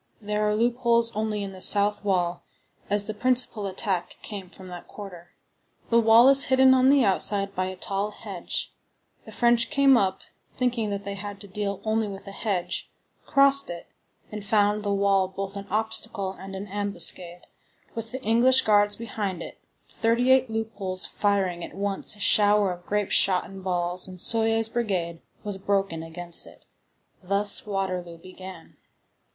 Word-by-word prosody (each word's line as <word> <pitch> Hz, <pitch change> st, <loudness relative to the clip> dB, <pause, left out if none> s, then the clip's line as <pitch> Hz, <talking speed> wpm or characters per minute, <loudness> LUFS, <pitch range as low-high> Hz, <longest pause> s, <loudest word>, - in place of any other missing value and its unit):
There 210 Hz, 0 st, -1 dB
are 210 Hz, -, 0 dB
loopholes 235 Hz, 0 st, +1 dB
only 215 Hz, -1 st, -2 dB
in 195 Hz, -, -6 dB
the 185 Hz, -1 st, -12 dB
south 205 Hz, +2 st, +6 dB
wall, 180 Hz, -3 st, -1 dB, 0.5 s
as 205 Hz, 0 st, +2 dB
the 215 Hz, -, -5 dB
principal 240 Hz, -2 st, 0 dB
attack 190 Hz, -1 st, -3 dB
came 195 Hz, -4 st, -7 dB
from 190 Hz, 0 st, -13 dB
that 175 Hz, -1 st, -10 dB
quarter. 180 Hz, -4 st, -11 dB, 0.6 s
The 230 Hz, -, +5 dB
wall 230 Hz, +2 st, +6 dB
is 275 Hz, 0 st, +6 dB
hidden 260 Hz, 0 st, +5 dB
on 260 Hz, 0 st, +4 dB
the 280 Hz, -2 st, +4 dB
outside 195 Hz, 0 st, 0 dB
by 185 Hz, -1 st, -2 dB
a 185 Hz, -, -6 dB
tall 195 Hz, +2 st, -3 dB
hedge; 200 Hz, -4 st, -5 dB, 0.5 s
the -, -, -11 dB
French 235 Hz, -1 st, +2 dB
came 280 Hz, -2 st, +4 dB
up, 190 Hz, -3 st, 0 dB, 0.3 s
thinking 240 Hz, -4 st, -1 dB
that 200 Hz, 0 st, -4 dB
they 200 Hz, 0 st, -5 dB
had 200 Hz, 0 st, -7 dB
to 200 Hz, -, -10 dB
deal 200 Hz, 0 st, -4 dB
only 220 Hz, 0 st, -1 dB
with 195 Hz, -1 st, -9 dB
a 195 Hz, -, -9 dB
hedge, 190 Hz, -4 st, -2 dB, 0.4 s
crossed 275 Hz, 0 st, +4 dB
it, 170 Hz, -1 st, -8 dB, 0.4 s
and 210 Hz, -1 st, -7 dB
found 210 Hz, 0 st, +1 dB
the 205 Hz, -1 st, -2 dB
wall 195 Hz, -1 st, +2 dB
both 195 Hz, +1 st, -7 dB
an 200 Hz, 0 st, -7 dB
obstacle 220 Hz, -2 st, -2 dB
and 195 Hz, 0 st, -10 dB
an 195 Hz, +1 st, -6 dB
ambuscade, 190 Hz, -3 st, -1 dB, 0.5 s
with 225 Hz, 0 st, -7 dB
the 260 Hz, +1 st, -7 dB
English 245 Hz, +4 st, +4 dB
guards 205 Hz, -1 st, +3 dB
behind 205 Hz, -6 st, -5 dB
it, -, -, -11 dB, 0.3 s
the -, -, -19 dB
thirty 235 Hz, +3 st, +1 dB
eight 260 Hz, -1 st, +3 dB
loopholes 210 Hz, -4 st, -2 dB
firing 195 Hz, -4 st, -1 dB
at -, -, -9 dB
once 200 Hz, +1 st, -1 dB
a -, -, -16 dB
shower 205 Hz, -1 st, +4 dB
of 175 Hz, 0 st, -10 dB
grape 210 Hz, -1 st, -1 dB
shot 185 Hz, -2 st, +3 dB
and 195 Hz, 0 st, -11 dB
balls, 180 Hz, 0 st, -2 dB
and 185 Hz, -1 st, -11 dB
Soye's 225 Hz, +2 st, +1 dB
brigade 190 Hz, -8 st, -3 dB, 0.2 s
was 205 Hz, -2 st, -5 dB
broken 195 Hz, -4 st, -1 dB
against 170 Hz, +1 st, -4 dB
it. -, -, -17 dB, 0.6 s
Thus 200 Hz, +3 st, +4 dB
Waterloo 185 Hz, -4 st, -4 dB
began. 185 Hz, 0 st, -12 dB
205 Hz, 170 wpm, -25 LUFS, 190-225 Hz, 0.6 s, south